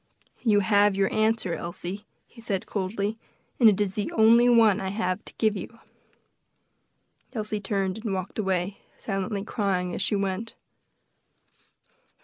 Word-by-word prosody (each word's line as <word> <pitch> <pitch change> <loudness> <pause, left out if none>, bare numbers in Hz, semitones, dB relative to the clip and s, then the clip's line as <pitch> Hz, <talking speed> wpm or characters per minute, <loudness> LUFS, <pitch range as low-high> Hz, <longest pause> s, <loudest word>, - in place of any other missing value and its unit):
"You 210 -4 +3
have 205 0 +3
your 195 0 +1
answer, 215 -4 +1
Elsie," 175 +5 -5 0.2
he 230 - -13
said 195 -4 -2
coldly; 200 +2 -3 0.4
"and 230 -3 +8
it 205 - +1
is 200 -2 0
the 205 0 -3
only 230 +2 +6
one 225 -4 +5
I 190 - -3
have 200 -1 -2
to - - -12
give 215 -2 +2
you." 215 +4 -7 1.6
Elsie 215 -3 -2
turned 195 0 -1
and 220 - -2
walked 190 +2 -4
away, 190 -1 -1 0.2
silently 195 0 -3
crying 190 -4 -1
as - - -3
she 205 - +1
went. 200 +3 -3
205 Hz, 140 wpm, -26 LUFS, 190-220 Hz, 1.6 s, and